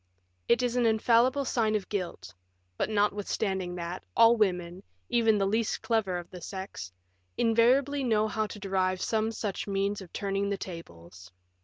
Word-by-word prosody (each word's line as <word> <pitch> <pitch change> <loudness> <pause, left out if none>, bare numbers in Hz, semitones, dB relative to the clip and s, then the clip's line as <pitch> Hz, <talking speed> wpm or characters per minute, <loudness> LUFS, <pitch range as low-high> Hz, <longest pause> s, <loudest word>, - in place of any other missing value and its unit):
It 240 +1 +3
is 245 -1 0
an 245 -2 +3
infallible 235 +5 +3
sign 220 -4 +1
of 205 -3 -2
guilt; 170 - -5 0.4
but - - -1
notwithstanding 205 -3 -1
that, 175 +1 -5 0.2
all 230 +1 +7
women, 180 -5 0 0.3
even 225 -2 +3
the 195 - +1
least 220 +3 0
clever 215 -6 0
of 175 -1 -7
the 180 - -9
sex, 190 - -7 0.5
invariably 255 +5 +3
know 220 -3 +2
how 215 0 -1
to 210 - -9
derive 190 -2 0
some 220 +2 0
such 210 -3 -4
means 200 +1 -1
of 180 - -12
turning 200 0 -2
the 200 - -1
tables. 90 - -10
205 Hz, 160 wpm, -29 LUFS, 185-225 Hz, 0.5 s, all